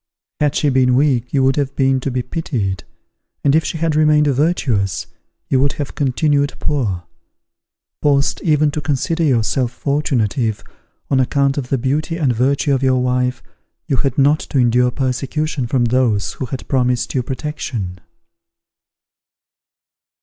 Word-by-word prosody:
Had 150 -1 +1
she 150 - +2
been 130 -2 +3
weak 130 -3 +1
you 135 -2 +2
would 135 +2 +2
have 140 -1 -1
been 135 -1 +2
to 135 - -3
be 125 -1 -2
pitied; 110 - -3 0.6
and 140 - +3
if 160 +1 +3
she 165 - -3
had 160 -1 0
remained 150 -1 +4
virtuous, 130 - 0 0.4
you 130 - +2
would 140 +2 +2
have 145 -2 -5
continued 145 0 +1
poor: 105 -12 -1 1.0
forced 140 -1 +2
even 150 -2 +2
to 150 - -3
consider 150 +3 -1
yourself 125 -2 +1
fortunate 140 -5 -1
if, 110 -5 -1 0.5
on 135 - +3
account 140 +1 +1
of 125 -3 -6
the 135 - +1
beauty 150 +6 -1
and 140 -7 +1
virtue 140 +4 +1
of 135 - +1
your 130 -1 +2
wife, 125 0 0 0.4
you 135 - 0
had 135 +1 -1
not 145 +2 +4
to 145 - -4
endure 125 0 +3
persecution 135 +2 -2
from 120 0 +1
those 115 -5 +1
who 130 - -5
had 130 +1 -6
promised 125 -2 0
you 130 - +1
protection. 125 - -5
135 Hz, 155 wpm, -18 LUFS, 125-145 Hz, 1.0 s, remained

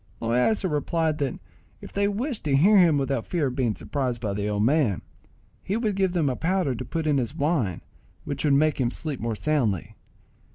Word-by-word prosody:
Loaysa 125 - +1
replied 155 0 0
that 140 -4 -2 0.4
if - - -11
they 200 0 +1
wished 230 +5 -3
to 140 -2 +2
hear 200 +7 +6
him 165 -5 +5
without 135 -3 -1
fear 170 -5 0
of 130 -2 -2
being 120 -5 0
surprised 130 -5 -3
by 105 -4 -2
the 105 +1 -2
old 105 0 0
man, 125 - +2 0.6
he 200 - -2
would 215 -4 -1
give 190 -2 +1
them 165 -5 +1
a 130 - 0
powder 175 -3 0
to 125 - -5
put 160 +5 -3
in 145 -3 +2
his 130 +4 -3
wine, 140 - 0 0.4
which 140 -2 -3
would 145 -2 +4
make 150 -1 +2
him 120 - +2
sleep 145 +1 -5
more 115 -1 -2
soundly. 115 - 0
145 Hz, 205 wpm, -25 LUFS, 125-170 Hz, 0.6 s, hear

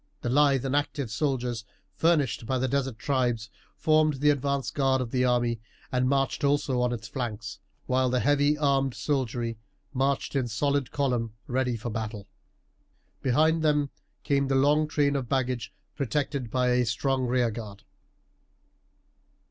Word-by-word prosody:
The 120 - -2
lithe 140 -1 +4
and 135 +1 0
active 145 -4 -1
soldiers 125 -3 -1 0.3
furnished 150 -9 +1
by 130 - +1
the 130 +1 0
desert 135 -3 -1
tribes 120 -3 -1 0.3
formed 155 -1 +3
the 145 +2 +3
advanced 140 -1 -1
guard 135 -2 +2
of 125 -3 -3
the 125 -1 +1
army, 120 -2 +1 0.3
and 125 0 +1
marched 135 0 0
also 140 -3 +2
on 125 0 +1
its 120 -1 -5
flanks, 110 -6 -5 0.3
while 130 0 +2
the 125 0 +1
heavy 145 +2 +3
armed 135 -3 +1
soldiery 120 -5 -2 0.3
marched 135 +1 0
in 130 -3 +1
solid 140 +3 0
column 125 -6 -1
ready 125 -1 0
for 120 +1 -5
battle. 105 -2 -5 0.9
Behind 155 +5 +3
them 150 -2 +2 0.3
came 140 -1 +1
the 135 - +1
long 145 +3 +3
train 145 -2 +1
of 130 -4 -2
baggage 130 -2 -1 0.2
protected 140 -2 -2
by 125 +1 +1
a 125 0 +3
strong 130 +3 0
rear 120 -1 +2
guard. 105 -2 -8
130 Hz, 150 wpm, -27 LUFS, 120-140 Hz, 0.9 s, lithe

